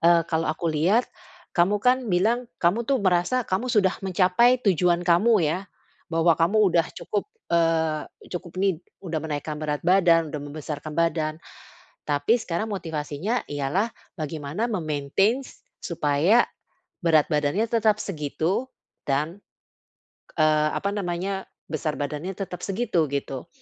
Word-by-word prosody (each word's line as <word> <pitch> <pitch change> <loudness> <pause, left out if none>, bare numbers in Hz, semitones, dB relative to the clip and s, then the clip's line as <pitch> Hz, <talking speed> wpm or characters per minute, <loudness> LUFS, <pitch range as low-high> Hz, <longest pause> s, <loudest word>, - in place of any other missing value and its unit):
eee, 170 0 +5
kalau 160 0 -1
aku 155 +2 -3
lihat 185 +11 +3 0.5
kamu 180 +4 +3
kan 250 +3 +2
bilang 225 +7 +1
kamu 195 +8 +1
tuh 275 - +3
merasa 185 +7 +2
kamu 205 +7 -1
sudah 205 -6 +3
mencapai 190 +6 +4
tujuan 175 -2 +2
kamu 185 +3 +4
ya, 155 +4 0 0.5
bahwa 165 +1 +3
kamu 170 +6 +3 0.2
udah 170 0 +3
cukup, 210 - -3 0.2
eee, 160 -2 +1 0.2
cukup 175 -1 -6
ini, 185 -4 +1 0.2
udah 165 -3 -2
menaikkan 150 0 -4
berat 150 0 -3
badan, 170 -4 +4
udah 150 - -4
membesarkan 150 +1 -6
badan. 160 -2 +1 0.7
Tapi 215 +12 +2
sekarang 210 +3 -3
motivasinya 165 +5 -3
ialah 145 +11 -1 0.2
bagaimana 155 +5 -3
me-maintains 195 - -1 0.2
supaya 165 +7 +2 0.6
berat 155 -3 +4
badannya 150 +7 +1
tetap 220 -2 +3
segitu 165 - -2 0.4
dan, 150 +6 -1 1.0
eee, 155 -1 +4
apa 200 - -1
namanya, 190 +1 -2 0.3
besar 155 -1 -2
badannya 150 +5 -3
tetap 180 -3 -5
segitu, 195 -6 0
gitu. 140 +1 -4
170 Hz, 125 wpm, -25 LUFS, 155-200 Hz, 1.0 s, eee